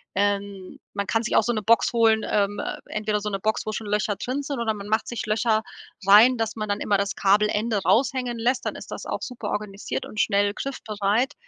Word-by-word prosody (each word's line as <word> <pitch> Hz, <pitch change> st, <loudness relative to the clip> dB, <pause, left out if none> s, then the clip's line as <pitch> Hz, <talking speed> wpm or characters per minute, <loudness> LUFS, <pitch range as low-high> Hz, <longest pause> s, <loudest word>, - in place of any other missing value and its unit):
Ähm, 200 Hz, -1 st, -2 dB
man 200 Hz, 0 st, -2 dB
kann 225 Hz, -, +1 dB
sich 235 Hz, -, -1 dB
auch -, -, +5 dB
so 240 Hz, -, 0 dB
'ne 215 Hz, -, -2 dB
Box 230 Hz, +3 st, +3 dB
holen, 225 Hz, -1 st, +4 dB
ähm, 205 Hz, 0 st, +1 dB, 0.3 s
entweder 215 Hz, 0 st, -1 dB
so 210 Hz, -, -2 dB
'ne 195 Hz, -1 st, -3 dB
Box, 220 Hz, +3 st, -1 dB
wo 215 Hz, -, -2 dB
schon 220 Hz, -, -4 dB
Löcher 210 Hz, 0 st, 0 dB
drin 255 Hz, +7 st, -3 dB
sind 280 Hz, -3 st, -4 dB
oder 220 Hz, -2 st, 0 dB
man 205 Hz, -1 st, -8 dB
macht 220 Hz, +1 st, +1 dB
sich 240 Hz, -, -4 dB
Löcher 220 Hz, 0 st, +1 dB, 0.4 s
rein 225 Hz, +5 st, +7 dB
dass 225 Hz, -1 st, -2 dB
man 215 Hz, -1 st, -4 dB
dann 205 Hz, -, 0 dB
immer 205 Hz, -2 st, +2 dB
das 200 Hz, 0 st, -2 dB
Kabelende 210 Hz, +2 st, +2 dB
raushängen 245 Hz, -1 st, +1 dB
lässt, 245 Hz, +3 st, 0 dB
dann -, -, -2 dB
ist -, -, -10 dB
das -, -, -6 dB
auch -, -, -4 dB
super 235 Hz, -5 st, -5 dB
organisiert 205 Hz, -1 st, -4 dB
und 215 Hz, -, -7 dB
schnell 200 Hz, -1 st, +2 dB
griffbereit. 220 Hz, 0 st, -1 dB
215 Hz, 220 wpm, -24 LUFS, 205-230 Hz, 0.4 s, rein